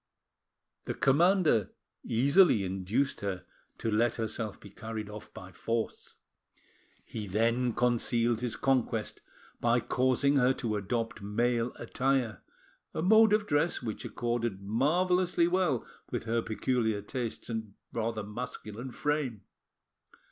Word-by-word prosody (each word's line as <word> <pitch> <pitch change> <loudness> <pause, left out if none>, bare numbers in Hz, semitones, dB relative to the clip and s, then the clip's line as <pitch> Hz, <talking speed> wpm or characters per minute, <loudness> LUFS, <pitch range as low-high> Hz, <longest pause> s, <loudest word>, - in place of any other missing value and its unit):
The - - -3
commander 155 - +3 0.3
easily 140 - +4
induced 95 +8 -1
her 95 -3 -3 0.3
to 115 - -2
let 115 +2 +2
herself 110 -2 -3
be 100 - -13
carried 110 -1 -6
off 105 0 -10
by 95 0 -10
force. 115 +3 -3 0.9
He 105 -2 -6
then 115 +5 +1
concealed 120 -1 +1
his 125 -2 -2
conquest 125 -5 0 0.4
by 120 +1 +3
causing 130 +4 +2
her 130 0 +4
to 115 -4 -2
adopt 115 +3 -2
male 115 +3 0
attire, 130 -5 -1 0.5
a 160 - -1
mode 220 +3 +6
of 210 0 +3
dress 150 -4 +1
which 110 -3 -4
accorded 120 -4 -2
marvellously 170 - +2
well 175 -8 +1 0.2
with - - -3
her 115 +1 0
peculiar 110 -2 0
tastes 120 +1 -4
and 110 -3 -5 0.2
rather 115 -1 -2
masculine 110 +2 -6
frame. 140 -5 -2
120 Hz, 120 wpm, -30 LUFS, 110-135 Hz, 0.9 s, mode